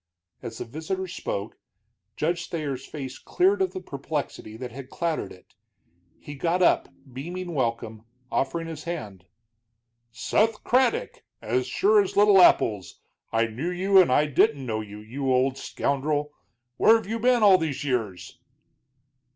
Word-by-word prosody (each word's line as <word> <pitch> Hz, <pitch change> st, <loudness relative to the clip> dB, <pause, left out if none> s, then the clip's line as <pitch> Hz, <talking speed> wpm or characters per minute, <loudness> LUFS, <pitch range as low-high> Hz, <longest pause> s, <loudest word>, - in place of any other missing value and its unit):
As 120 Hz, -3 st, -7 dB
the -, -, -5 dB
visitor 160 Hz, +9 st, -4 dB
spoke, 105 Hz, -, -5 dB, 0.6 s
Judge 170 Hz, +2 st, -1 dB
Thayer's 140 Hz, -5 st, -4 dB
face 135 Hz, -4 st, -7 dB
cleared 195 Hz, +2 st, +1 dB
of 185 Hz, -1 st, +1 dB
the 185 Hz, -, -5 dB
perplexity 140 Hz, -8 st, -5 dB
that 125 Hz, 0 st, -7 dB
had 130 Hz, +2 st, -9 dB
clouded 165 Hz, -, -2 dB
it. 90 Hz, -, -17 dB, 0.6 s
He 145 Hz, -, -10 dB
got 170 Hz, +5 st, 0 dB
up, -, -, +3 dB, 0.2 s
beaming 175 Hz, +6 st, -6 dB
welcome, 115 Hz, -4 st, -2 dB, 0.3 s
offering 165 Hz, +5 st, -1 dB
his 160 Hz, -1 st, -8 dB
hand. 105 Hz, -, -6 dB, 0.9 s
"Seth 210 Hz, -, 0 dB
Craddock, 255 Hz, 0 st, +1 dB, 0.2 s
as 125 Hz, +3 st, -1 dB
sure 205 Hz, +10 st, +4 dB
as 195 Hz, -, -4 dB
little 205 Hz, -2 st, +7 dB
apples! 105 Hz, -, +3 dB, 0.3 s
I 115 Hz, 0 st, +2 dB
knew 120 Hz, +10 st, -4 dB
you, 190 Hz, +2 st, +4 dB
and 175 Hz, -, +2 dB
I 145 Hz, +4 st, +4 dB
didn't 140 Hz, -1 st, +2 dB
know 110 Hz, -2 st, -2 dB
you, 105 Hz, 0 st, -10 dB
you 130 Hz, +5 st, -3 dB
old 130 Hz, +1 st, +2 dB
scoundrel! 145 Hz, +1 st, -1 dB, 0.5 s
Where 225 Hz, -, +6 dB
have 225 Hz, -, -1 dB
you 225 Hz, +3 st, -3 dB
been 245 Hz, 0 st, +3 dB
all 195 Hz, -3 st, +7 dB
these 155 Hz, -4 st, -3 dB
years?" 115 Hz, -10 st, -3 dB
145 Hz, 150 wpm, -25 LUFS, 125-185 Hz, 0.9 s, little